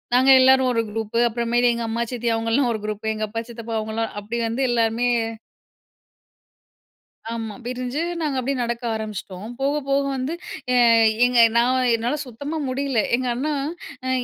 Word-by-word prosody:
நாங்க 260 +2 +4
எல்லாரும் 260 0 +5
ஒரு 230 - +2
குரூப்பு 225 +1 -2
அப்புற 235 +1 -3
மேல் 245 0 +4
எங்க 235 - -3
அம்மா, 230 +1 -1
சித்தி 240 -1 -1
அவங்கலாம் 230 +3 +1
ஒரு 220 - -3
குரூப் 215 +1 -2
எங்க 215 0 -2
அப்பா, 230 +1 -3
சித்தப்பா 230 -1 -6
அவங்கலாம் 220 +1 -3
அப்டி 230 +3 -4
வந்து 235 +4 -1
எல்லாருமே 230 +1 +1 2.3
ஆமா. 225 -2 -4
பிரிஞ்சு 255 +4 -3 0.2
நாங்க 290 -4 -1
அப்டியே 265 +2 -1
நடக்க 235 +1 -3
ஆரம்பிச்சிட்டோம். 210 -2 -6
போக, 280 +2 +1 0.2
போக 275 0 +2
வந்து 265 +5 -2 0.4
எ - - +3 0.5
எங்க 245 -1 +3 0.2
நான் 250 +1 +3
என்னால 240 +6 -1
சுத்தமா 285 +6 -5
முடில 260 -3 0 0.2
எங்க 255 - -2
அண்ணா 295 +5 -1 0.5
அ - - 0
235 Hz, 155 wpm, -22 LUFS, 225-260 Hz, 2.3 s, எல்லாரும்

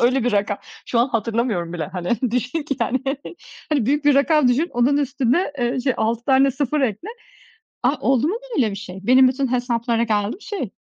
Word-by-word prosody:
öyle 250 +1 +2
bir 245 - +1
rakam. 205 0 0 0.3
Şu 235 - 0
an 240 +3 +3
hatırlamıyorum 225 -6 -1
bile, 170 -3 -3
hani, 180 +1 -5 0.2
düşün 250 +6 -1
ki, 285 -2 -3
yani. 235 +3 +1 0.7
Hani, 275 -8 +1
büyük 290 +3 +1
bir 290 -1 +5
rakam 280 0 +4
düşün 280 +8 +1
onun 245 +4 +2
üstüne, 285 +3 0
eee, 245 +2 0
şey, 260 -1 0
6 230 +2 -1
tane 270 0 +4
0 285 +2 -1
ekle. 255 - -2 0.7
A, 255 +4 +3
oldu 270 +2 +2
mu 375 - -1 0.2
böyle 235 -6 +2
bir 200 - -6
şey? 190 -2 -8
Benim 255 +4 +6
bütün 260 0 -1
hesaplara 235 -1 0
geldi 210 - 0
mi, - - -20
şey, 395 - -4
250 Hz, 200 wpm, -21 LUFS, 230-275 Hz, 0.7 s, Benim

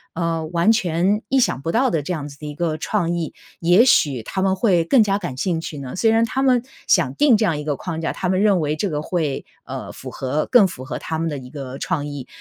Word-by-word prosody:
呃， 165 -1 -1
完 170 +5 +3
全 190 -1 +1
意 270 - +3
想 135 - 0
不 165 - -2
到 255 +3 +3
的 165 -3 0
这 160 +6 -3
样 150 -4 -4
子 140 - -13
的 150 - -8
一 150 - -5
个 165 -2 -1
创 175 -1 -1
意， 165 -3 -3 0.3
也 175 +6 +5
许 135 - +3
他 190 - -3
们 190 0 +2
会 185 -5 +2
更 255 +6 +5
加 200 -1 +1
感 175 -10 -5
兴 170 +2 0
趣 160 -2 -6
呢？ 130 -2 -7
虽 225 - +3
然 225 +1 +3
他 265 +3 -2
们 255 -3 +3 0.2
想 - - +3
定 285 -5 +5
这 220 - 0
样 165 -7 0
一 - - -5
个 150 -2 0
框 165 +2 -5
架， 165 - -1
他 185 - -2
们 185 +1 +1
认 205 -3 +4
为 150 0 0
这 200 +5 -1
个 150 -2 -2
会， 155 -4 -2 0.2
呃， - - -6
符 - - -9
合 135 +3 -2
更 225 -6 +7
符 130 -5 -9
合 - - -4
他 160 -1 -4
们 165 - -1
的 145 - -4
一 125 -1 -10
个 135 -2 -7
创 150 -5 -2
意， 145 -3 -7
170 Hz, 285 characters per minute, -21 LUFS, 150-200 Hz, 0.3 s, 更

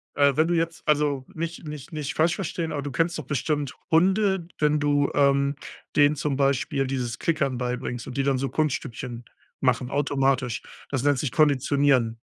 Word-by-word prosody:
Äh, 140 -2 +4
wenn 155 +1 +3
du 175 - +1
jetzt, 165 -1 -1
also 145 -3 +1
nicht 165 0 -5
nicht 150 0 -8
nicht 150 -1 -3
falsch 165 +2 +3
verstehen 165 -3 -3
aber 145 - -2
du 145 0 -5
kennst 165 +6 0
doch 155 - -5
bestimmt 145 0 -1 0.2
Hunde, 190 +1 +3
wenn 150 0 +3
du, 145 -1 +2
ähm, 140 0 +3 0.4
denen 145 0 +5
zum 145 -1 -1
Beispiel 135 0 +1
dieses 125 -3 -3
Klickern 140 -6 0
beibringst 125 -1 -3
und 130 - -7
die 135 - +2
dann 135 -1 +2
so 135 0 -2
Kunststückchen 125 -4 -3 0.4
machen, 125 -1 +1
automatisch. 135 -3 0 0.3
Das 135 -2 -2
nennt 145 -2 +3
sich 130 -4 -2
Konditionieren. 140 -5 +2
145 Hz, 175 wpm, -25 LUFS, 130-155 Hz, 0.4 s, denen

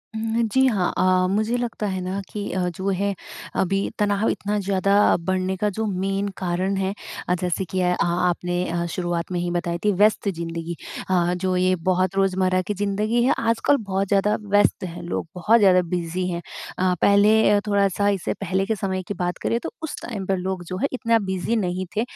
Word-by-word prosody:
हुँ, 225 +1 -1
जी, 265 0 +4
हाँ, 200 -7 +1
अ, 185 0 +3
मुझे 220 +3 +1
लगता 235 -3 -3
है 190 -1 -2
ना 185 +2 -3
कि 205 -1 -4
अ, 185 - -1 0.2
जो 190 +1 -1
है 200 +1 0 0.4
अभी 195 +2 0
तनाव 205 +1 +2
इतना 205 +1 -1
ज़्यादा 195 0 +1 0.2
बढ़ने 185 +2 -1
का 210 +2 +1
जो 220 - -1
मेन 195 0 -1
कारण 185 +1 -1
है 195 +1 -1 0.4
अ, 180 - +4
जैसे 180 +1 -1
कि 185 +3 -3
अ, 180 0 +2
आपने 175 +1 0
अ, 170 0 -1
शुरुआत 175 -1 -2
में 175 - -1
ही 175 0 -2
बताई 175 -1 -1
थी 210 - +5
व्यस्त 210 -1 +4
ज़िंदगी। 165 -1 -4 0.3
अ, 175 -1 +2
जो 185 +1 -1
ये 185 +1 +3
बहुत 185 +1 +1
रोजमर्रा 185 -1 +2
की 205 +3 -3
ज़िंदगी 210 +4 0
है 260 - +4
आजकल 230 +5 +2
बहुत 195 -2 -2
ज़्यादा 205 +2 +2
व्यस्त 205 -2 +2
है, 175 -1 -6
लोग 170 -1 -3
बहुत 215 +6 +4
ज़्यादा 185 -3 +5
बिज़ी 180 +1 -1
हैं। 170 - -3 0.4
अ, 185 0 +2
पहले 205 +1 +5
थोड़ा-सा 200 0 +2
इससे 195 -3 -1
पहले 190 0 0
के 220 - 0
समय 190 -2 -2
की - - -2
बात 180 -2 -2
करें 235 - 0
तो - - -4
उस 320 - -4
टाइम 205 -6 -5
पर 190 0 0
लोग 185 0 -3
जो 185 +2 -5
है 275 - +1
इतना 230 -2 +2
बिज़ी 190 +5 -1
नहीं 185 -3 -1
थे 220 - +2
190 Hz, 200 wpm, -23 LUFS, 180-205 Hz, 0.4 s, थी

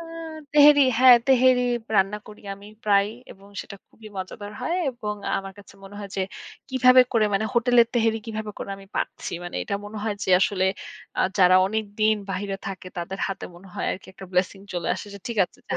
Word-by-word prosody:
আ - - -7 0.5
তেহেরি 290 -1 +8
হ্যাঁ, 255 -1 +9
তেহেরি 255 -1 +5 0.3
রান্না 195 +2 +2
করি 210 - -13
আমি 200 +1 -14 0.2
প্রায়। 200 -1 +4 0.2
এবং 195 +1 -18
সেটা 200 - -10
খুবই 220 -1 -14
মজাদার 205 +2 -6
হয়। 335 +8 -1
এবং 215 -4 -5 0.2
আমার 195 0 -7
কাছে 200 0 -15
মনে 195 - -12
হয় 200 -2 -7
যে, 190 - +1 0.5
কিভাবে 255 0 +6
করে 220 -2 +3
মানে 195 - +1
হোটেলের 235 0 +5
তেহেরি 225 -1 +2
কিভাবে 220 -1 -4
করে - - -6
আমি 195 - -14
পাচ্ছি। - - -3
মানে 175 - -6
এটা 200 - -3
মনে 210 +1 -7
হয় 215 -2 -2
যে - - -1
আসলে 190 -1 +2 0.5
আ - - +4 0.2
যারা 185 0 +7
অনেকদিন 215 +1 0 0.2
বাহিরে 195 0 -3
থাকে, 185 -1 -6
তাদের 190 +3 -5
হাতে 195 - -5
মনে 190 +2 -14
হয় - - -3
আরকি 190 - -9
একটা 190 0 -11
blessing 190 +2 0
চলে 175 -2 -3
আসে। - - -8
যে 200 - -8
ঠিক 230 -3 -4
আছে - - -18
যা - - -1
205 Hz, 200 wpm, -24 LUFS, 195-230 Hz, 0.5 s, হ্যাঁ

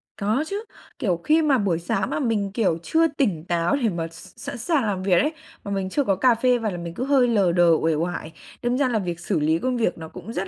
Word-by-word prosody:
Có 215 +8 0
chứ, 405 +4 -4 0.4
kiểu, 180 -6 0
khi 315 +2 +4
mà 295 -4 +3
buổi 190 -7 0
sáng 190 +3 -1
mà - - -2
mình, 220 -7 0
kiểu, 200 -8 +1
chưa 325 - +3
tỉnh 240 - -1
táo 175 +2 +1
để 225 - +3
mà 170 -3 -3
s 165 0 -14
sẵn 280 -2 -6
sàng 270 +4 +1
làm 195 -4 -2
việc 185 -3 +4
ấy, 305 +2 0 0.3
mà 200 - -6
mình 195 -1 -2
chưa 285 +9 +1
có 200 -6 +1
cà 240 +5 +4
phê 250 +2 +2
vào 225 -3 -2
là 175 - -5
mình 170 -1 -6
cứ 240 - -4
hơi 270 -3 +4
lờ 200 -7 +3
đờ, 175 0 +4
uể 160 -1 +2
oải, 165 0 -3 0.3
đâm 240 +1 +1
ra 280 -1 +2
là 230 -3 +1
việc 175 -3 -4
xử 175 -1 -1
lý 160 +2 +2
công 255 +3 -1
việc 225 -7 0
nó 160 -1 -8
cũng 225 - -9
rất 195 -1 -3
200 Hz, 270 wpm, -23 LUFS, 175-250 Hz, 0.4 s, khi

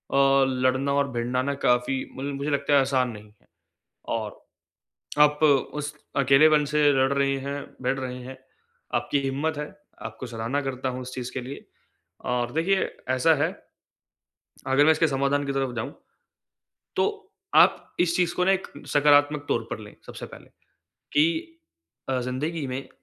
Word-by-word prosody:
लड़ना 135 0 +3
और 140 0 +1
भिड़ना 120 +1 -1
ना 140 +1 -1
काफ़ी 125 +2 +1
मल 140 +2 -3
मुझे 140 +2 -3
लगता 140 +1 0
है 140 - +7
आसान 130 -2 +1
नहीं 105 -1 -11
है। - - -31 0.7
और 110 -2 -4 0.8
आप 150 +1 +5
उस 145 0 +1 0.2
अकेलेपन 145 +3 +5
से 150 +2 -1
लड़ 135 0 +2
रही 140 0 +2
हैं, 140 +1 -4 0.2
भीड़ 130 +1 0
रही 125 -1 -5
हैं, 130 +1 -9 0.6
आपकी 145 - +1
हिम्मत 140 +4 -1
है। 150 0 -4 0.3
आपको 130 - -7
सराहना 115 +4 -2
करता 135 -1 -3
हूँ 125 0 -5
उस 125 0 -8
चीज़ 125 -1 -5
के 130 - -3
लिए। 135 +3 -8 0.7
और 120 -1 0
देखिए 190 +5 +1 0.2
ऐसा 130 +5 +4
है - - +3 1.2
अगर 135 +2 +4
मैं 160 - +7
इसके 165 +1 +2
समाधान 140 0 0
की - - 0
तरफ 135 -2 -1
जाऊँ 120 +5 -4 1.0
तो - - +3 0.5
आप - - +4
इस 175 -1 +2
चीज़ 175 -1 +1
को 180 - +2
ना 190 - +4
एक 190 0 -1 0.3
सकारात्मक 145 0 +4
तौर 115 - +1
पर - - -3
लें, 105 -1 -11
सबसे - - -8
पहले। - - -13 0.7
कि 160 - +2 0.6
अ, 130 -1 +1
जिंदगी 140 +5 -3
में 130 +1 -3
अ, - - -20
135 Hz, 165 wpm, -25 LUFS, 130-145 Hz, 1.2 s, है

